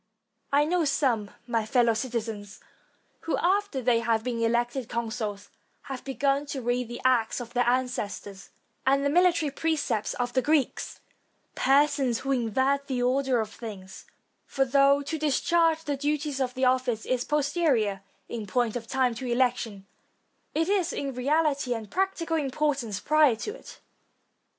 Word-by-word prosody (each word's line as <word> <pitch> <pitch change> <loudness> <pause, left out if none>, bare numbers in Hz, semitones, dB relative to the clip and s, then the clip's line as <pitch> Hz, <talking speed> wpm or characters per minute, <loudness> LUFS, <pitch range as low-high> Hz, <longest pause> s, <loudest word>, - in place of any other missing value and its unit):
I 285 +1 +4
know 345 +2 +1
some, 250 -8 +1 0.2
my 230 -2 0
fellow 235 +1 +3
citizens, 220 -4 -4 0.6
who, 330 - -2
after 380 -7 0
they 235 -1 +3
have 230 -1 0
been 240 -2 -2
elected 240 +2 0
consuls, 220 -3 -4 0.3
have 265 -2 -7
begun 275 +1 0
to 275 -2 -4
read 245 0 0
the 240 +1 -7
acts 245 -3 +2
of 240 -1 -8
their 245 -1 +1
ancestors, 210 -6 -3 0.3
and 275 +1 +2
the 280 - +2
military 345 -3 +3
precepts 285 -8 -1
of 245 0 -2
the 260 - +2
Greeks; 290 -2 0 0.5
persons 275 -3 +2
who 270 - -2
invert 265 +3 +1
the 250 -2 -1
order 260 0 +2
of 220 0 -5
things; 200 -6 -9 0.4
for 270 -1 +1
though 280 +2 +4
to 320 +3 -4
discharge 320 +2 +2
the 290 -3 -2
duties 290 -1 -1
of 250 -1 -1
the 260 0 +1
office 255 -3 +1
is 250 -1 0
posterior 280 - +1 0.3
in 225 -3 -5
point 240 +2 0
of 230 -2 -5
time 260 -1 +1
to 250 +3 -6
election, 235 -5 0 0.7
it 325 +2 +1
is 385 -3 +1
in 275 -1 -3
reality 280 -1 +1
and 220 -2 -7
practical 365 -4 0
importance 270 -7 -1
prior 305 -1 +4
to 325 - -5
it. - - -13
255 Hz, 155 wpm, -27 LUFS, 235-290 Hz, 0.7 s, I